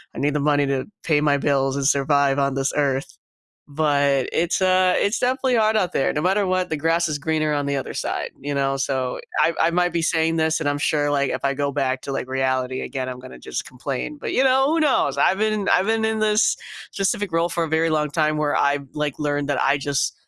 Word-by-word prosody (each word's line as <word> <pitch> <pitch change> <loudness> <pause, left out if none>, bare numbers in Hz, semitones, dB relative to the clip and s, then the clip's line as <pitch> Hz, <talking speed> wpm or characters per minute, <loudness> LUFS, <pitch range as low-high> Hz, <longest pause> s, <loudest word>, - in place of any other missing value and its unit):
I - - -5
need 145 +1 +1
the 150 - 0
money 145 0 +2
to 135 -1 -1 0.2
pay 150 -3 +2
my 145 -1 +2
bills 135 -1 0
and 140 -1 -2
survive 140 -1 +2
on 140 -1 0
this 135 0 -1
earth. 135 -2 -1 0.5
But 140 -3 +1
it's, 170 +3 0
uh, 185 -1 +3
it's 200 +3 +1
definitely 255 0 +1
hard 220 -1 +3
out 185 -5 +1
there. 135 - +1
No 150 - -1
matter 190 +4 +1
what, 185 -1 0
the 155 - -2
grass 165 +2 +1
is 150 - -2
greener 155 0 0
on 145 -1 -1
the 140 0 -1
other 135 - -5
side, - - -3
you 145 +1 -4
know. 135 0 0
So, 130 -2 -2 0.2
I 165 - +3
I 165 - +3
might 175 0 +1
be 170 -1 -1
saying 160 0 +1
this, 160 0 +1
and 150 - -1
I'm 145 - 0
sure, 145 0 0
like, 140 -2 +1
if - - -3
I 140 - +1
go 140 0 -2
back 130 -2 -1
to, 140 - -5
like, 130 - -4
reality 130 -1 -1
again, 130 -2 -4
I'm 125 - -6
gonna 130 0 -11
just - - -5
complain, 135 - -5
but, - - -4
you 265 - +3
know, 265 +1 +4
who 320 +3 +1
knows? 295 -4 +2
I've 190 - +2
been 215 -1 0
I've 185 - +3
been 225 0 +1
in 220 0 0
this 215 0 +2 0.4
specific 195 -1 -1
role 165 +1 +1
for 170 -1 -1
a - - -4
very 160 +1 +1
long 150 -1 0
time 155 0 +1
where 150 -1 0
I've, 140 0 +1
like, 150 -2 -3
learned 145 -1 -1
that 145 - 0
I 140 +1 +2
just 140 0 -1
150 Hz, 245 wpm, -22 LUFS, 140-175 Hz, 0.5 s, know